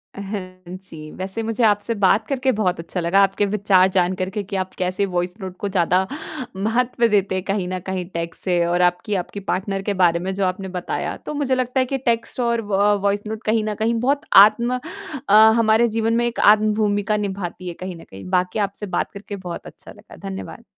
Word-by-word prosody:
अ, 200 - -6
हाँ 185 -3 -7
जी। 155 -4 -10
वैसे 190 +4 -4
मुझे 225 +1 -1
आपसे 210 +1 +2
बात 200 +3 +4
करके 265 -1 +1
बहुत 180 -4 +1
अच्छा 170 +2 -5
लगा। 170 +4 +2
आपके 195 +1 +1
विचार 195 -2 +3
जान 180 0 +3
कर 185 - -1
के 205 +1 -4
कि 195 +1 -6
आप 185 0 -3
कैसे 185 +2 0
वॉइस 180 0 -2
नोट 185 -1 -6
को 205 - -2
ज़्यादा 185 0 +2 0.5
महत्व 235 +4 +1
देते 200 -3 +1
हैं 185 - -2
कहीं 195 -2 -1
न 185 0 -3
कहीं 190 -2 -3
टेक्स्ट 170 0 -5
से 175 -2 +1
और 175 +1 +1
आपकी, 180 +4 +1
आपकी 185 +2 -4
पार्टनर 195 +1 -2
के 205 0 -2
बारे 170 -1 +4
में 190 +2 -3
जो 195 0 0
आपने 185 +1 -2
बताया। 180 - -3
तो - - -4
मुझे 275 -3 0
लगता 255 +1 0
है 255 - +3
कि 270 +1 -2
टेक्स्ट 230 +2 -2
और 235 -1 +1
व 205 +2 +4
वॉइस 200 0 +1
नोट 220 +1 -5
कहीं 220 0 +1
न 215 0 -2
कहीं 220 +3 0
बहुत 280 +4 +1 0.2
आत्म 240 +3 0 0.5
अ, 200 - +4 0.3
हमारे 225 +1 +4
जीवन 225 0 0
में 240 +1 +2
एक 240 -1 -3
आत्म-भूमिका 210 0 +3
निभाती 190 -3 -4
है 175 - -4
कहीं 185 -1 -5
न 165 - -12
कहीं। 95 0 -10
बाकी 180 +2 0
आपसे 200 +1 -2
बात - - -1
करके 200 0 -8
बहुत 180 -3 -7
अच्छा - - -12
लगा। - - -15
धन्यवाद। 95 0 -7
200 Hz, 215 wpm, -21 LUFS, 185-220 Hz, 0.5 s, बात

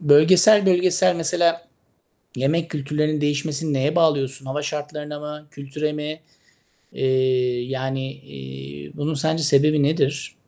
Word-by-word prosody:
bölgesel 180 +7 +6
bölgesel 180 0 +3
mesela 170 0 +1 0.7
yemek 160 +6 -1
kültürlerinin 150 +1 -2
değişmesini 145 +1 -2
neye 140 +3 -1
bağlıyorsun? 140 -5 +1
Hava 135 +3 -4
şartlarına 150 0 -6
mı, 150 0 -9
kültüre 150 +1 -5
mi? 150 +1 -6 0.7
Eee, 130 -2 0
yani, 135 +1 -5
eee, 70 - -11
bunun 150 +2 -3
sence 160 +3 0
sebebi 150 0 +4
nedir? 145 -2 -1
150 Hz, 115 wpm, -21 LUFS, 135-160 Hz, 0.7 s, bölgesel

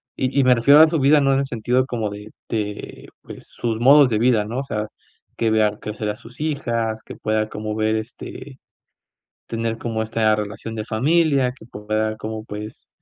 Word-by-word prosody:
y 130 +1 -2
y - - +5
me 130 0 +6
refiero 140 +6 +6
a 160 - +8
su 160 0 0
vida 145 +2 +5
no 135 0 +3
en 135 - +2
el 140 - 0
sentido 125 +1 0
como 115 -5 -3
de 105 +1 -9 0.2
de 105 -2 -5
pues, - - -11
sus 115 -2 -3
modos 140 +2 +7
de 110 -3 0
vida, 115 -2 +3
¿no? 115 +5 -4
O - - -2
sea, 105 -5 -3 0.5
que 115 -1 +1
vea 105 -1 +2
crecer 105 0 -4
a 105 - -2
sus 120 +3 -13
hijas, 115 -7 -2
que - - -10
pueda 110 0 -1
como 105 0 -5
ver, 110 0 +1
este, 125 +4 -7 0.9
tener 115 0 -2
como 115 -1 -2
esta 110 -1 +2
relación 105 +2 -5
de 110 - -3
familia, 135 +3 +2
que 130 - -16
pueda 110 -1 -2
como 110 0 -6
pues 105 0 -8
115 Hz, 200 wpm, -21 LUFS, 110-130 Hz, 0.9 s, a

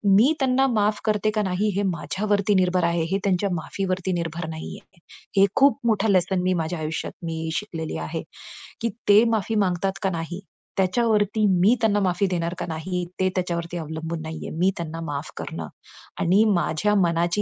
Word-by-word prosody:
मी 250 +9 +5
त्यांना 265 0 +3
माफ 210 0 +2
करते 215 -1 +1
का 215 - +2
नाही 190 +2 0
हे 200 - +1
माझ्यावरती 195 +5 0
निर्भर 180 -1 +2
आहे. 170 0 +1
हे 195 - +2
त्यांच्या 195 0 +1
माफीवरती 185 +2 -2
निर्भर 170 -1 -3
नाहीये. 160 +2 -9 0.4
हे 195 - +7
खूप 280 0 +4
मोठं 215 -1 +2
लेसन 185 0 +2
मी 185 0 +2
माझ्या 160 +1 -3
आयुष्यात 155 +1 -3
मी 160 -1 -3
शिकलेली 165 - -4
आहे, - - -4 0.6
की 230 - +1 0.2
ते 210 +3 +8
माफी 220 +1 0
मागतात 185 +2 -1
का 195 - +2
नाही, 170 +1 -4 0.4
त्याच्यावरती 210 +1 +2
मी 210 +7 +5
त्यांना 205 -2 +3
माफी 180 +3 +1
देणार 170 -1 -1
का - - -2
नाही, 175 +3 -3
ते 185 0 +3
त्याच्यावरती 175 -1 -2
अवलंबून 160 +1 -5
नाहीये. 160 0 -6
मी 185 +2 +4
त्यांना 165 -1 -5
माफ 145 +1 -5
करणं - - -5 0.5
आणि 190 +5 +4
माझ्या 180 +4 +1
मनाची 170 +3 +1
185 Hz, 170 wpm, -24 LUFS, 170-205 Hz, 0.6 s, ते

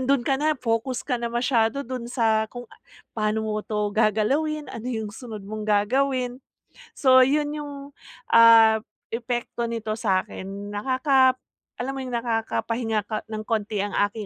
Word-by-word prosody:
andun 270 +1 +2
ka 270 - +2
na, 310 +1 +3
focus 235 +1 -1
ka 250 - 0
na 235 - -2
masyado 240 0 +1
dun 250 -1 -5
sa 225 -3 +2
kung 245 0 -7
a - - -17 0.4
paano 215 0 0
mo 215 0 -1
‘to 210 -1 -1
gagalawin, 275 +9 +1
ano 230 - -7
yung 220 -3 -3
sunod 220 -2 -8
mong 215 +1 -6
gagawin. 250 +4 +1 0.6
So 260 -2 +6
yun 295 +2 0
yung, 295 -1 -6 0.6
ah, 225 -1 +8 0.4
epekto 235 0 -3
nito 225 -2 -3
sa’kin 200 -1 -3
nakaka 260 +3 +3 0.4
alam 265 +2 -3
mo 270 - -5
yung 260 - -6
nakakapahinga 225 -1 -1
ka 215 0 -3
nang 215 0 -5
konti 215 -2 -2
ang 200 0 -2 0.2
aking 215 0 -7
230 Hz, 155 wpm, -24 LUFS, 215-255 Hz, 0.6 s, ah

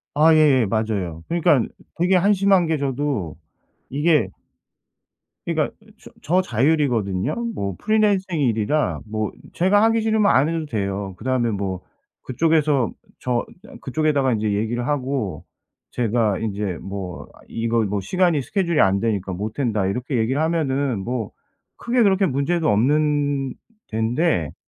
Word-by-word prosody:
아 160 +2 +6
예예. 145 -6 +5
맞아요. 100 -7 -2
그러니깐 165 -7 +2 0.3
되게 180 +3 +3
한심한 195 -1 +3
게 160 - +1
저도 135 - -2 0.5
이게 145 - +2 1.2
그러니까 - - -1
이 - - -20
저 - - -14
저 180 +4 +2
자율이거든요. 120 - 0 0.2
뭐 100 - -3
프리랜서 210 -3 +2
일이라 115 - 0
뭐 110 -1 -3 0.2
제가 200 +4 +3
하기 225 0 +3
싫으면 220 -2 +3
안 135 +4 +4
해도 165 -1 -2
돼요. 100 -6 -3
그다음에 125 -1 0
뭐 95 -3 -3 0.4
그쪽에서 150 -2 +1 0.3
저 125 -2 -1
이 - - -19
그냥 - - -13
그쪽에다가 140 -2 +1
인제 105 -2 0
얘기를 120 +4 -1
하고 130 - -2 0.5
제가 115 -4 0
인제 100 -4 -3
뭐 95 -3 -6
아 - - -20
이거 115 0 0
뭐 100 -1 -1
"시간이 170 - +1
스케줄이 170 - -1
안 95 +1 +4
되니까 100 -4 -1
못한다." 105 +1 -2
이렇게 125 +6 -2
얘기를 130 +7 0
하면은 140 -7 0
뭐 115 +1 -3 0.5
크게 240 0 +1
그렇게 195 -1 +3
문제도 160 +3 0
없는 145 +3 +1 0.4
덴데 110 - 0
130 Hz, 300 characters per minute, -22 LUFS, 105-160 Hz, 1.2 s, 아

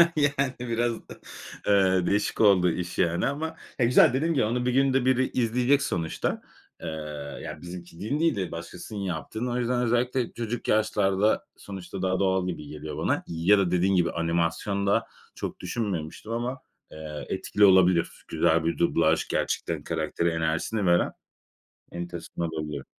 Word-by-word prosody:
Yani, 140 -3 +1
biraz 120 -1 0 0.2
da, - - -7 0.5
eee, 95 -3 +4
değişik 105 +2 0
oldu 95 -5 +5
iş, 90 +1 -4
yani 85 +5 +2
ama, 160 +4 -3 0.2
eee, 120 - +4
güzel. 120 0 +6
Dediğim 160 +6 +1
gibi, 130 -7 +2
onu 120 +3 -1
bir 125 - +2
günde 135 -1 +3
biri 130 0 +3
izleyecek 125 +3 +2
sonuçta. 85 -11 -2 0.4
Eee, - - -5 0.6
yani, - - -7
bizimkinin 90 - -5
değil 165 -3 +2
de 95 -3 -3
başkasının 85 +5 -7
yaptığını. 100 +6 -3
O 120 - -1
yüzden 125 0 0
özellikle 120 +1 0
çocuk 120 0 -4
yaşlarda, 105 -1 +2
sonuçta 95 -1 -7
daha 95 0 0
doğal 95 -1 +1
gibi 80 -4 -5
geliyor 75 +1 -7
bana - - 0
ya 85 +5 +3
da 95 -3 +1
dediğin 90 +2 +2
gibi 85 -2 +2
animasyonda 85 +4 0 0.3
çok - - -5
düşünmemiştim 100 -2 -4
ama, 120 +3 -3 0.3
eee, 75 -2 -7
etkili 105 - +2
olabilir 95 -3 +4
güzel 80 0 +2
bir 85 - 0
dublaj - - +2
gerçekten, - - -2
karaktere 85 - -1
enerjisini 80 +6 -1
veren. 85 -1 +3 0.8
Enteresan 85 -1 -6
olabiliyor. 75 -4 -4
100 Hz, 150 wpm, -26 LUFS, 85-120 Hz, 0.8 s, güzel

